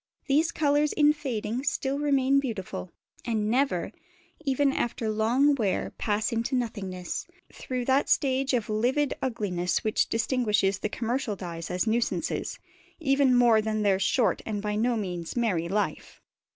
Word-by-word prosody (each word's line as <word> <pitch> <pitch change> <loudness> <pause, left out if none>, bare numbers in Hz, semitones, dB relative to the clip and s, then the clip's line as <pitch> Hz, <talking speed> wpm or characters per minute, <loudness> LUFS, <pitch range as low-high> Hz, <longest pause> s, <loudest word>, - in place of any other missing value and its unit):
These 305 +4 +2
colours 295 0 +2
in 300 -1 +4
fading 250 -4 -3
still 270 0 -1
remain 275 -2 +3
beautiful, 215 -8 -5 0.3
and 215 -2 -1
never, 245 -9 +1 0.5
even 275 -1 +2
after 235 -3 -2
long 240 +7 +3
wear, 215 -8 -1
pass 210 +2 0
into 230 +3 -1
nothingness, 195 -7 -3 0.3
through 250 -1 -4
that 270 +2 +2
stage 265 -1 +2
of 230 -3 -1
livid 250 +7 +1
ugliness 190 -9 -1
which 215 - +1
distinguishes 215 -5 +1
the 215 - -2
commercial 235 0 -2
dyes 170 -3 -6
as 180 +3 0
nuisances, 230 +1 -1 0.4
even 275 -4 +3
more 235 -3 +5
than 215 0 -1
their 195 -2 +3
short 220 +4 +2
and 210 -2 -3
by 210 0 -2
no 235 +2 +1
means 180 -5 -4
merry 200 -9 0
life. 205 +2 -2
230 Hz, 145 wpm, -27 LUFS, 210-270 Hz, 0.5 s, more